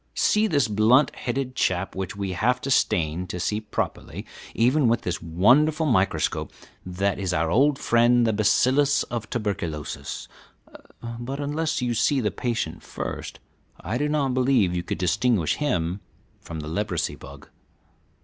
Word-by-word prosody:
See 215 +1 +3
this 145 - +2
blunt 110 +7 +3
headed 130 +1 -3
chap 90 -5 0
which 95 0 -4
we 100 -1 -3
have 120 +8 +1
to 135 - -3
stain 85 -6 +1
to 90 - -5
see 105 +4 -1
properly, 105 -1 -4 0.3
even 125 +4 +3
with 115 0 +2
this 85 -2 -3
wonderful 130 - +3
microscope; 100 -9 0 0.3
that 95 +3 -1
is 95 -2 -1
our 80 0 0
old 140 +6 +3
friend 120 -1 +3
the 110 - +2
bacillus 130 +7 +3
of 115 -3 -4
tuberculosis; 85 - -4 0.9
but 135 +4 -5
unless 150 0 -1
you 120 -1 0
see 135 +5 +2
the 105 -4 0
patient 115 -10 -3
first - - -6 0.4
I 110 +8 -3
do 150 +1 0
not 145 -4 0
believe 125 -8 +2
you 90 - 0
could - - -4
distinguish 100 -1 +1
him 90 - -1 0.4
from 80 -2 -7
the 75 - -7
leprosy 95 +1 -2
bug. - - -12
115 Hz, 150 wpm, -24 LUFS, 90-130 Hz, 0.9 s, See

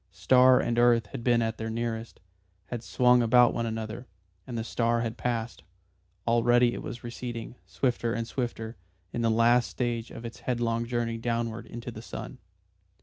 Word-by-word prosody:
Star 125 +8 +5
and 120 0 0
earth 120 -2 +4
had 120 - -6
been 120 -1 +3
at 110 0 -2
their 110 0 -3
nearest, 115 0 -4 0.5
had 120 -2 -4
swung 125 0 +4
about 120 +1 +5
one 115 0 -1
another, 110 +2 -5 0.4
and 120 -2 -4
the 115 - -2
star 115 0 0
had 115 -1 -3
passed. 120 -2 -3 0.6
Already 120 +1 +4
it - - -5
was 120 - -7
receding, 120 -1 -6
swifter 120 -3 0
and 115 -1 -2
swifter, 120 -4 -4 0.4
in 120 - -2
the 115 - +2
last 115 +2 +4
stage 120 -2 -2
of 115 - -9
its 115 - -7
headlong 120 -1 -1
journey 115 -1 -1
downward 115 -1 -2
into 120 +1 -7
the 110 - -9
sun. 125 +2 -8
115 Hz, 170 wpm, -28 LUFS, 115-120 Hz, 0.6 s, Star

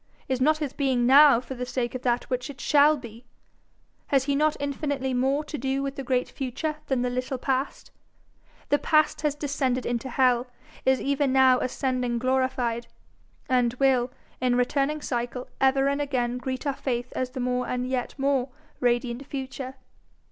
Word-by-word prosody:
Is 260 -1 -1
not 305 +3 +4
his 295 -4 -4
being 260 -4 +1
now 275 -1 +7
for 260 - -7
the 250 -1 -5
sake 245 -1 -2
of 255 - -4
that 245 -1 +1
which 250 +1 -3
it 275 - -9
shall 295 +1 +4
be? 235 -2 -11 0.8
Has 275 -2 +3
he 280 +1 0
not 305 +1 +2
infinitely 280 -2 -2
more 265 +4 +1
to 300 0 -6
do 270 +2 -1
with 275 0 -3
the 275 - -4
great 250 -1 0
future 290 +4 -4
than 260 -2 0
the 250 - 0
little 255 +1 -2
past? 265 +2 -2 0.8
The 290 - +3
Past 310 +1 +2
has 300 -2 0
descended 270 -4 -1
into 240 +2 -2
hell, 250 -1 +2 0.4
is 265 -1 +4
even 280 -1 0
now 260 -1 +5
ascending 250 -2 -1
glorified, 255 -2 0 0.6
and 245 -2 +2
will, 255 -2 +2 0.3
in 250 -1 +2
returning 275 +4 +1
cycle, 245 0 -3
ever 270 +1 +4
and 280 +1 0
again 250 -3 -1
greet 260 +2 -4
our 280 - +1
faith 250 -2 -3
as 255 -1 -1
the 255 +1 -7
more 250 0 -1
and 250 0 -2
yet 255 0 -3
more 275 -2 +1 0.3
radiant 245 +2 0
Future. 265 -1 -6
260 Hz, 175 wpm, -26 LUFS, 250-275 Hz, 0.8 s, now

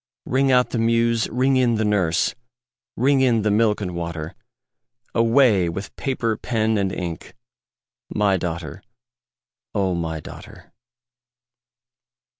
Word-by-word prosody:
Ring 135 +1 +2
out 125 -1 +3
the 120 - -1
muse! 115 0 +2
ring 130 +3 +2
in 120 -2 +3
the 110 0 0
nurse! 95 -4 +1 0.6
Ring 135 +2 +3
in 120 -5 +3
the 105 - +1
milk 105 0 +2
and 90 -3 -4
water! 85 -1 -5 0.8
Away 115 -6 +3
with 100 +4 -6
paper, 115 -5 -2
pen, 110 -2 0
and 95 -1 0
ink 85 -2 -6 0.7
My 100 -2 +2
daughter, 85 0 -4 0.9
O 95 -3 +1
my 80 -2 -3
daughter! - - -12
105 Hz, 120 wpm, -22 LUFS, 90-115 Hz, 0.9 s, out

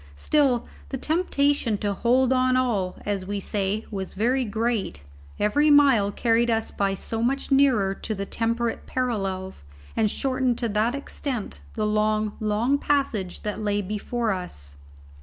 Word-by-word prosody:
Still 265 - +2 0.2
the 265 - -3
temptation 285 - +1
to 205 0 -1
"hold 250 +5 +3
on 255 0 +3
all," 210 -8 0
as 200 -2 -1
we 205 0 -2
say, 200 +2 -2
was 190 -2 -5
very 250 +6 +1
great; 220 - -2 0.4
every 290 +9 +3
mile 270 -9 +5
carried 235 +2 +2
us 225 -1 0
by 195 -1 0
so 225 +3 -3
much 270 +4 -1
nearer 255 -8 +4
to 215 +2 -5
the 200 0 -4
temperate 230 +2 -2
parallels, 195 -7 -2 0.3
and 215 -1 +2
shortened 255 0 0
to 235 - -1
that 215 +4 +1
extent 255 - -5
the 215 - 0
long, 215 0 +1
long 225 +6 +1
passage 260 -12 -1
that 210 0 -3
lay 205 -1 0
before 215 +3 -2
us. 125 - -6
225 Hz, 150 wpm, -25 LUFS, 205-255 Hz, 0.4 s, mile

